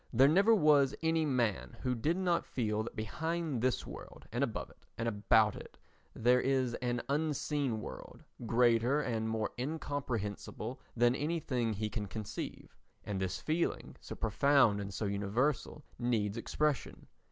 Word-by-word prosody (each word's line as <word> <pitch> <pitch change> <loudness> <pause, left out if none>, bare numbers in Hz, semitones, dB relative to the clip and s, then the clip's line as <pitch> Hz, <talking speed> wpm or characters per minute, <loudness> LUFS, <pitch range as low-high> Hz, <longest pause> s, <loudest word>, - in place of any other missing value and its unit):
There 130 +4 +6
never 200 +9 +5
was 145 -7 +4
any 160 -1 +2
man 110 - 0
who 125 - 0
did 150 +9 0
not 180 -2 +1
feel 110 -4 -1
that 115 - -6
behind 160 +4 -2
this 130 0 +1
world - - -10
and - - 0
above - - -3
it - - -25
and 115 - -1
about 105 0 +3
it - - -11 0.4
there 125 +2 +4
is 130 -2 +1
an 120 -1 -1
unseen 145 -4 0
world 65 - -9 0.2
greater 120 +3 +3
and 115 -5 -1
more 110 -1 -1
incomprehensible 125 -5 -4 0.2
than 120 +1 +5
anything 135 -6 -1
he 105 +1 -2
can 105 -3 -3
conceive, 105 +1 -6 0.3
and 100 -2 -3
this 95 0 -2
feeling, 160 - -1
so - - -7
profound 135 -8 +3
and 100 0 -5
so 100 +3 -3
universal, 110 +9 -1 0.2
needs 110 -4 0
expression. 145 +4 -1
125 Hz, 150 wpm, -33 LUFS, 110-145 Hz, 0.4 s, There